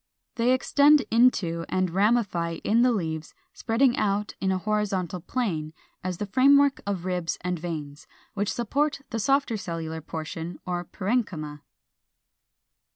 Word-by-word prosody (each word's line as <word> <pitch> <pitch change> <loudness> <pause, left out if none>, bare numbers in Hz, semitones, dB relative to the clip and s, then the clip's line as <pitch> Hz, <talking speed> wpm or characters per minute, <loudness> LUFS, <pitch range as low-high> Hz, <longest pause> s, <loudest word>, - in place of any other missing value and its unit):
They 240 0 +2
extend 285 +3 +5
into 205 -8 +3
and 185 -2 0
ramify 190 -4 +1
in 230 +3 +3
the 250 0 +5
leaves, 160 -7 -3 0.2
spreading 240 +2 +2
out 205 -2 0
in 190 - +1
a 190 - +1
horizontal 195 -3 -1
plane, 165 -6 -3 0.3
as 185 -1 -3
the 210 - -3
framework 275 +6 +4
of 190 -3 -2
ribs 180 -3 -2
and 180 -1 -2
veins, 150 -4 -6 0.3
which 205 0 -1
supports 280 +5 -1
the 230 - -2
softer 270 0 +1
cellular 165 -4 -5
portion 160 +2 -6
or 175 -1 -2
parenchyma. 185 - -2
195 Hz, 135 wpm, -26 LUFS, 170-240 Hz, 0.3 s, extend